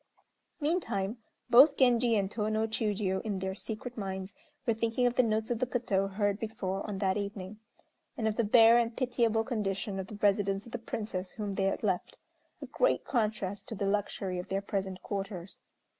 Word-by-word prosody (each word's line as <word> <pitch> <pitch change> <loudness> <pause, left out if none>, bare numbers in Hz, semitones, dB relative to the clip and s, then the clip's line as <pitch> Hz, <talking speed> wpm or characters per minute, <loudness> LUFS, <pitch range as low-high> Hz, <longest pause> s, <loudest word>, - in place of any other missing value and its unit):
Meantime, 245 - -1 0.3
both 270 +4 +7
Genji 240 -2 +4
and 195 -1 0
Tô 215 0 -1
no 220 +1 +1
Chiûjiô, 210 -3 -1
in 210 -3 -2
their 190 0 -2
secret 220 +4 -5
minds, 190 -2 -4 0.3
were 230 - +3
thinking 230 +2 0
of 245 - +3
the 255 - +4
notes 220 -1 0
of 235 - 0
the 255 - 0
koto 205 -6 0
heard 205 +1 0
before 200 -3 -3
on 205 -2 -3
that 190 0 +1
evening, 200 0 -5 0.6
and 220 - 0
of 215 - 0
the 235 - +2
bare 225 +2 +7
and 230 -1 -1
pitiable 235 -3 +1
condition 205 -4 -2
of 190 - -4
the 210 - -8
residence 200 -1 +1
of 235 - -12
the 245 - -4
Princess 210 -5 -4
whom 210 -3 -4
they 195 0 0
had 195 - -1
left 190 -4 -1 0.5
a - - -4
great - - +1
contrast 210 -5 -1
to 225 - -5
the 200 - -2
luxury 195 -2 -1
of 180 - -6
their 195 - 0
present 190 -2 -3
quarters. 195 -2 -5
210 Hz, 190 wpm, -31 LUFS, 195-230 Hz, 0.6 s, both